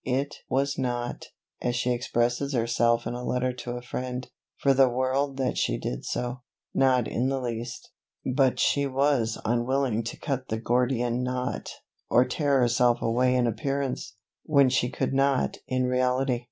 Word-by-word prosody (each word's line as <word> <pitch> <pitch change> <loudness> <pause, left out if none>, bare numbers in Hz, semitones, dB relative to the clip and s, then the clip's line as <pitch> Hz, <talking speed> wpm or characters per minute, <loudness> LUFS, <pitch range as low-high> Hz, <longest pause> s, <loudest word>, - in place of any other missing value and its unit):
"It 135 +3 -1
was 140 +2 0
not," 120 -2 -3 0.3
as 120 0 0
she 125 0 0
expresses 120 +3 0
herself 115 -1 +2
in - - -3
a 125 0 -5
letter 125 0 0
to 125 -1 -6
a 120 0 -6
friend, 125 0 -4 0.3
"for 140 - +3
the 135 -1 +5
world 130 +2 0
that 130 -1 0
she - - +1
did 60 - -4
so 125 0 -3 0.3
not 130 -3 +3
in 125 +3 0
the 135 0 0
least 120 -1 -5 0.3
but 130 0 +2
she 140 -1 +2
was 135 -4 +1
unwilling 120 0 +1
to - - -5
cut 135 -2 -3
the 110 - -2
Gordian 120 +1 +1
knot, 125 0 -3 0.4
or 125 - +5
tear 140 -4 +1
herself 120 0 +3
away 125 +2 +2
in 125 -1 +3
appearance, 135 +1 -2 0.3
when 140 -3 +4
she 125 0 +1
could 130 +1 -2
not 135 -1 +2
in 130 0 0
reality". 125 0 +1
125 Hz, 165 wpm, -27 LUFS, 120-135 Hz, 0.4 s, the